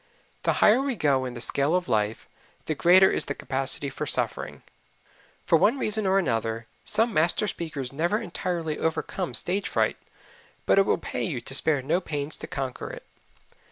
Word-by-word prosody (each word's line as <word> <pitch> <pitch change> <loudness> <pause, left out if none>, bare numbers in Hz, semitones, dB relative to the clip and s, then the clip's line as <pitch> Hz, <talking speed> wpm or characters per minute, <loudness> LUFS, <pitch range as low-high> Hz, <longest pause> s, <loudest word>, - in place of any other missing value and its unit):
The - - +1
higher 225 +5 +6
we 275 -2 -1
go 140 -7 +1
in 125 -1 -6
the 120 - -5
scale 140 +6 +1
of 180 -1 -1
life, 105 0 -1 0.4
the 155 - -1
greater 185 +5 +6
is - - 0
the 145 - -4
capacity 135 +1 +1
for - - -5
suffering. - - -2 0.8
For 165 - +4
one 230 - +3
reason 215 -5 0
or 190 +1 +3
another, 115 - -1 0.2
some 225 +1 +1
master 170 +6 +2
speakers 145 -9 -4
never 170 +8 0
entirely 175 -8 -3
overcome 165 +2 -2
stage 195 +3 -1
fright, - - +1 0.7
but - - +4
it 195 - +3
will - - +2
pay - - -4
you 145 -9 -2
to 135 - -7
spare 145 -1 +1
no 160 +7 +1
pains 150 -3 -4
to - - -8
conquer 135 -2 -5
it. - - -9
160 Hz, 180 wpm, -26 LUFS, 135-190 Hz, 0.8 s, higher